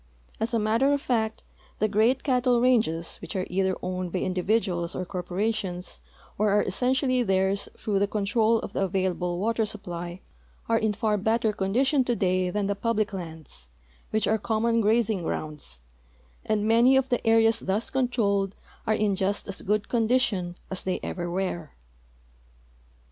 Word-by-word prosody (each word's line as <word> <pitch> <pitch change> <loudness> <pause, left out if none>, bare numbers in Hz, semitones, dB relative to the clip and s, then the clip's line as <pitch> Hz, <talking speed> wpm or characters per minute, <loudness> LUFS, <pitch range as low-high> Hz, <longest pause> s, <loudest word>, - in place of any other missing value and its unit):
As 225 +1 -1
a 235 - +1
matter 225 +6 +2
of 285 - +1
fact, 225 -5 -1 0.3
the 215 - +2
great 220 +5 +2
cattle 250 -3 +2
ranges, 220 -10 +2
which 175 - -8
are 185 -1 -1
either 190 0 +1
owned 185 -1 -3
by 185 - -1
individuals 185 -1 0
or 185 - -3
corporations, 185 +1 -3 0.4
or 210 0 +3
are 205 +1 +3
essentially 255 +5 +1
theirs 190 -2 +1
through 205 -2 0
the 200 - +2
control 215 +2 +2
of - - -7
the - - 0
available 185 -2 -1
water 225 +4 +1
supply, 175 -4 -5 0.5
are 230 0 +3
in 220 -1 +1
far 210 0 0
better 220 +1 +1
condition 255 +8 +2
today 185 -7 +1
than 205 +2 -1
the 200 - +1
public 215 0 -1
lands, 160 - -8 0.4
which 215 -1 0
are 220 0 +2
common 230 +2 +1
grazing 220 -2 +2
grounds, 150 - -5 0.6
and 215 -1 0
man}' 235 +4 +5
of 265 0 +1
the 245 - 0
areas 225 0 +4
thus 200 +4 -2
controlled 205 -7 +1 0.3
are 215 - +3
in 210 -2 +1
just 195 +2 -1
as 200 -1 -4
good 210 +1 +1
condi 240 +1 +2
tion 180 -8 -2 0.2
as 190 - -4
they 185 -1 -1
ever 175 -1 -3
were. 175 -4 -3
210 Hz, 160 wpm, -26 LUFS, 185-230 Hz, 0.6 s, man